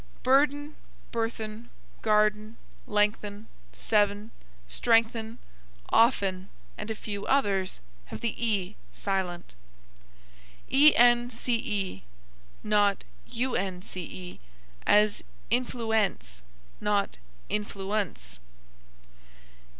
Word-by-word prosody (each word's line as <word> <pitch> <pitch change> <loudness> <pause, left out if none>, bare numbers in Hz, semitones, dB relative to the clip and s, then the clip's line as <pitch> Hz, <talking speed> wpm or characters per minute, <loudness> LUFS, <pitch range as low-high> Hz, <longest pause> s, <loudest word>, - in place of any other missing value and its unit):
Burden, 290 +3 +2 0.4
burthen, 225 -1 -4 0.3
garden, 215 +1 +2 0.3
lengthen, 210 0 0 0.3
seven, 205 - +1 0.4
strengthen, 225 - +1 0.5
often, 195 -5 +2 0.3
and 210 - -7
a 220 - -2
few 205 -1 -5
others, 200 -9 +1 0.3
have - - -8
the 230 -2 -1
e 205 -3 0 0.2
silent. 185 -3 -3 1.2
ence, 245 -4 +5 1.2
not 205 -2 +2 0.3
unce, 185 -6 -4 0.5
as 210 0 +4 0.3
influence, 225 - 0 0.4
not 205 -1 0 0.3
influ 205 -2 -3
unce. 105 - -3
210 Hz, 70 wpm, -28 LUFS, 195-230 Hz, 1.2 s, ence